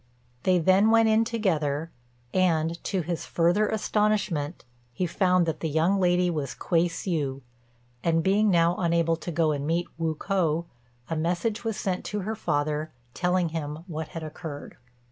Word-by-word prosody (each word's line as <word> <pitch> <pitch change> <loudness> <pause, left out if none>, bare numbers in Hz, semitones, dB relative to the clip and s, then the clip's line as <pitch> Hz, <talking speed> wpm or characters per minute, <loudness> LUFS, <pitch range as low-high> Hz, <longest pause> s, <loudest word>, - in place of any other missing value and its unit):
They 185 -1 +3
then 190 +5 +4
went 225 0 +5
in 220 +1 +4
together, 165 -9 -1 0.4
and, 170 -2 +1
to 190 - 0
his 170 0 -4
further 175 +5 +2
astonishment, 210 - 0 0.3
he 180 +9 -2
found 180 0 +2
that 160 -2 -2
the 160 - -2
young 165 +6 +2
lady 180 -1 +3
was 150 -6 -2
Kuei 170 0 +1
hsiu; 150 -6 -2 0.6
and, 165 -1 +2
being 205 +3 +3
now 170 -1 +3
unable 170 -1 +2
to 170 - -7
go 160 -1 +2
and 145 -1 -2
meet 170 +2 +1
Wu 160 -1 0
k'o, 170 -2 0 0.4
a 165 - -2
message 175 +8 -1
was 225 -2 -2
sent 185 -3 -2
to 210 -1 -3
her 215 +4 -3
father, 150 -4 -1 0.2
telling 180 -1 +1
him 155 -1 -5
what 160 -4 -5
had 165 - -7
occurred. 155 -1 -8
170 Hz, 165 wpm, -26 LUFS, 160-190 Hz, 0.6 s, went